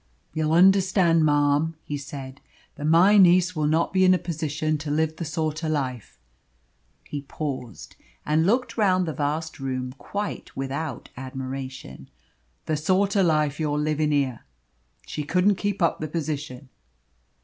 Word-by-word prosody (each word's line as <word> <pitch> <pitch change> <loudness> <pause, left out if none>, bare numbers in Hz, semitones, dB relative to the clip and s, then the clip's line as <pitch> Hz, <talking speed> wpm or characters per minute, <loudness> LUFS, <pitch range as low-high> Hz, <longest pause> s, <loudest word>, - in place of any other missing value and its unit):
"You'll 155 0 0
understand, 185 -2 +4
marm," 145 +2 +2
he 145 - -4
said, 140 -1 -8 0.3
"that 145 - -6
my 185 +6 +6
niece 180 0 +5
will 155 -1 0
not 160 +4 +1
be 190 0 +4
in 185 0 +6
a - - +1
position 155 -2 -2
to 150 0 -5
live 160 +1 0
the 170 - -4
sort 155 +1 -2
o' - - -1
life" 130 -7 -3 0.9
he 145 - -6
paused, 135 - -6 0.3
and 155 +3 +2
looked 240 +2 0
round 185 -3 +3
the 160 - -2
vast 155 +3 -3
room, 130 -1 -3
quite 205 +1 -5
without 135 0 -4
admiration 130 - -7 0.6
"the 155 - 0
sort 190 +6 +1
o' 200 - +4
life 155 -4 +1
you're 150 -2 0
livin' 150 0 0
here. 135 -5 0 0.7
She 150 - -5
couldn't 180 +6 +2
keep 200 -1 -1
up 170 - +1
the 155 - -3
position." 145 -4 -5
155 Hz, 150 wpm, -25 LUFS, 145-175 Hz, 0.9 s, my